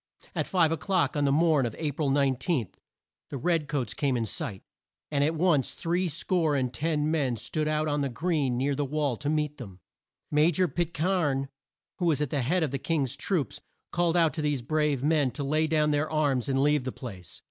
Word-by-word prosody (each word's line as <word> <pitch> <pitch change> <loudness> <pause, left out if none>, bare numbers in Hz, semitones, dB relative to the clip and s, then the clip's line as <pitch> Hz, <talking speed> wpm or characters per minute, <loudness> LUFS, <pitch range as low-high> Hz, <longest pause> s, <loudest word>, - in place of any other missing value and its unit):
At - - -1
five 170 -4 +3
o'clock, 175 +2 0
on 145 -1 +1
the 140 - +3
morn 155 -1 +3
of 115 - -6
A 155 -2 -1
pril 140 0 -1
19, 135 - +1 0.6
the 140 - -4
red 165 +2 0
coats 140 -7 -2
came 140 -4 0
in 115 - -1
sight, 100 -2 -5 0.5
and 140 -1 +2
at 160 +3 +1
once 160 -6 +2
three 175 +2 -1
score 165 -1 0
and 130 -2 -1
ten 155 0 0
men 140 -6 +1
stood 135 +7 -2
out 155 0 0
on 145 -1 0
the 140 - 0
green 140 -1 0
near 140 +3 +1
the 145 +1 -1
wall 145 -2 -1
to 145 - -3
meet 150 -1 -1
them. 95 -8 -10 0.5
Ma 150 +1 +4
jor 180 +2 +2
Pit 170 -1 -2
cairn 150 -6 0 0.5
who 180 - 0
was 155 -5 +2
at 150 -3 -1
the 140 - 0
head 165 +8 +1
of 150 - -1
the 140 - -2
King's 140 -4 -1
troops 145 - -2 0.3
called 175 0 +1
out 165 -2 +3
to 155 - -3
these 145 -4 -1
brave 150 -1 0
men 150 -3 +3
to 140 - -5
lay 155 +3 +1
down 155 -1 +2
their 145 +1 0
arms 145 -5 +1
and 135 0 +2
leave 150 -2 +3
the 130 - -3
place. 95 -10 -9
150 Hz, 215 wpm, -28 LUFS, 135-160 Hz, 0.6 s, Ma